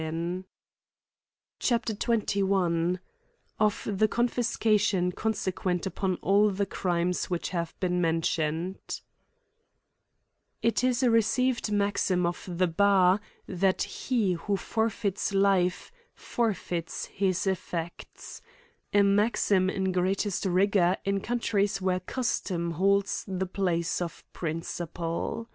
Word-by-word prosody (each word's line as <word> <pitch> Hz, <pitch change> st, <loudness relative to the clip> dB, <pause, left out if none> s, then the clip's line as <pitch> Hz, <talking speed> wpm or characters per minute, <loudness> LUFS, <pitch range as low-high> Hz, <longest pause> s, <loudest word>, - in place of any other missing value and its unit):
ir 170 Hz, +3 st, -3 dB, 1.2 s
CHAP 235 Hz, -2 st, +1 dB
XXI. 195 Hz, -6 st, +1 dB, 0.6 s
(}f 215 Hz, -1 st, +2 dB
the 210 Hz, +1 st, +2 dB
conUscaiion 215 Hz, -6 st, +1 dB
eonsequi^t 185 Hz, -5 st, -1 dB
upon 190 Hz, 0 st, -1 dB
all 205 Hz, +3 st, +4 dB
the 200 Hz, 0 st, -1 dB
erimes 180 Hz, -2 st, -1 dB
which 175 Hz, -2 st, -2 dB
have 170 Hz, -2 st, -4 dB
been 180 Hz, -1 st, 0 dB
mentioned, 165 Hz, +1 st, -1 dB, 1.6 s
IT 230 Hz, +1 st, +2 dB
is 255 Hz, 0 st, +2 dB
a 245 Hz, -, +4 dB
received 235 Hz, +1 st, +2 dB
maxim 200 Hz, -3 st, +1 dB
of 175 Hz, +2 st, -3 dB
the 180 Hz, +1 st, +2 dB
bar, 190 Hz, +2 st, +4 dB, 0.3 s
that^ 190 Hz, 0 st, +1 dB
he 225 Hz, -8 st, 0 dB
who 195 Hz, +4 st, -1 dB
forfeits 215 Hz, -2 st, -1 dB
Rfe^ 195 Hz, -2 st, +2 dB, 0.2 s
forfeits 185 Hz, -7 st, -2 dB
his 190 Hz, -2 st, -1 dB
effects 175 Hz, -3 st, -5 dB, 0.2 s
— 470 Hz, 0 st, -38 dB
a 205 Hz, -, +6 dB
maxim 200 Hz, -2 st, +3 dB
in 190 Hz, 0 st, -1 dB
greatest 190 Hz, +2 st, 0 dB
rigor 185 Hz, 0 st, +3 dB
in 195 Hz, 0 st, +1 dB
countries 205 Hz, -4 st, 0 dB
where 185 Hz, -1 st, 0 dB
custom 185 Hz, -5 st, -2 dB
holds 195 Hz, +4 st, +1 dB
the 190 Hz, -1 st, -2 dB
place 180 Hz, -3 st, -1 dB
of 170 Hz, -1 st, -5 dB
principle. 165 Hz, +5 st, -4 dB
190 Hz, 110 wpm, -28 LUFS, 175-205 Hz, 1.6 s, a